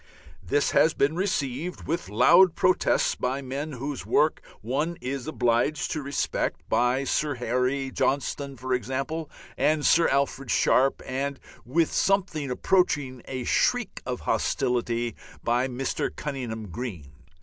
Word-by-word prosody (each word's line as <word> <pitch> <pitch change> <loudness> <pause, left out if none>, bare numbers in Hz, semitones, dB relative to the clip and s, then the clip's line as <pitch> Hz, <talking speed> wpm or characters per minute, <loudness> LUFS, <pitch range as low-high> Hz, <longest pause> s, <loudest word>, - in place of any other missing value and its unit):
This 100 +10 +1
has 160 - +4
been 145 +3 +2
received 175 -3 -2
with 170 +3 -3
loud 170 - +6
protests 185 - +2
by 135 +2 -2
men 140 +4 -4
whose 135 +2 -5
work 155 +1 +2 0.2
one 145 +10 -1
is 130 -1 -4
obliged 125 +1 +1
to 155 - -2
respect, 140 0 -2
by 125 +3 +2
Sir 145 +1 0
Harry, 125 +2 -1
Johnston, 140 0 -1
for 130 +1 -2
example, 135 +6 -2 0.3
and 150 -1 +2
Sir 165 0 +5
Alfred 135 -1 0
Sharpe, 135 +4 +3
and 135 +1 -3 0.3
with 160 +5 +2
something 185 -8 +1
approaching 135 -3 +1
a 130 -2 -4
shriek - - +1
of - - -4
hostility 120 -1 0 0.3
by 120 +2 +1
Mr. 130 +1 -2
Cunninghame 120 -8 -5
Graham. 90 - -6
135 Hz, 130 wpm, -26 LUFS, 125-150 Hz, 0.3 s, loud